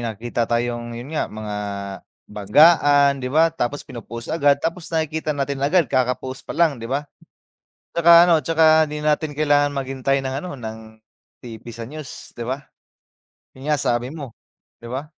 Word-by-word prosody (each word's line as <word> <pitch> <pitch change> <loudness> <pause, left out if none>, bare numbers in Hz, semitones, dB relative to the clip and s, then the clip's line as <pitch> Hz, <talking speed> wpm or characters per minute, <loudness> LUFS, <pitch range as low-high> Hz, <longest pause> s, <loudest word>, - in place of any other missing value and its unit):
nakikita 115 0 -3
tayong 120 0 -2
'yun 130 +6 -8
nga, 155 - -1
mga 105 -1 -6 0.7
banggaan, 140 - +4
di 125 - -3
ba, 160 +3 +3
tapos 145 -2 -3
pino-post 115 +1 -8
agad 145 -3 +3
tapos 165 +3 -4
nakikita 160 -2 -2
natin 140 0 -2
agad 165 +5 +3
kaka-post 130 +1 -1
pa - - -5
lang, 155 -8 +2
di 115 - -6
ba? 140 +3 -2 0.9
Tsaka 170 +1 +7
ano, 160 -4 +3
tsaka 160 0 +4
hindi 150 0 -4
natin 150 0 0
kailangan 145 -1 +3
maghintay 135 0 -1
ng 135 0 -4
ano, 180 - -6
ng 110 -1 -6 0.6
TV 115 -3 -10
sa 115 0 -8
news, 150 -1 -10
di 120 - -5
ba? 130 +4 -3 0.9
'Yun 135 +3 -8
nga, 150 - +3
sabi 120 0 -1
mo, 140 -6 -8 0.5
di 120 - -9
ba? 130 +4 -4
140 Hz, 160 wpm, -21 LUFS, 120-155 Hz, 0.9 s, Tsaka